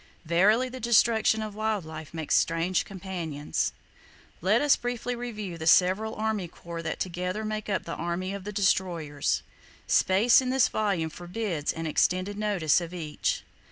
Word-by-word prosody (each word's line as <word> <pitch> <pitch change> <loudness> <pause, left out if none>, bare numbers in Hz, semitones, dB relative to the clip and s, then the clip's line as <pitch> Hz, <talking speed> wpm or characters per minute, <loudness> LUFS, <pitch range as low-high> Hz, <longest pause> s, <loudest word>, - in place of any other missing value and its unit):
Verily, 205 +10 +4
the 255 0 -8
destruction 220 -1 +3
of 215 -1 -6
wild 215 -3 -1
life 160 -1 -8
makes 160 -2 -3
strange 165 +2 +1
companions. 175 -6 -3 0.7
Let 200 +7 +3
us 290 +1 +5
briefly 245 0 -3
review 215 -8 -6
the 160 - -3
several 190 +6 +4
army 215 -4 -1
corps 170 0 -8
that 160 -1 -4
together 180 +4 -3
make 215 0 -4
up 190 -3 0
the 165 - -5
army 175 +3 -3
of 200 -1 -6
the 210 - -5
destroyers. 175 -7 0 0.4
Space 215 +7 +4
in 255 - -2
this 260 -1 +3
volume 195 -7 0
forbids 175 -2 -3
an 165 0 -5
extended 185 +5 +1
notice 200 -7 +2
of 170 +1 -6
each. 155 -4 -2
190 Hz, 160 wpm, -27 LUFS, 170-215 Hz, 0.7 s, us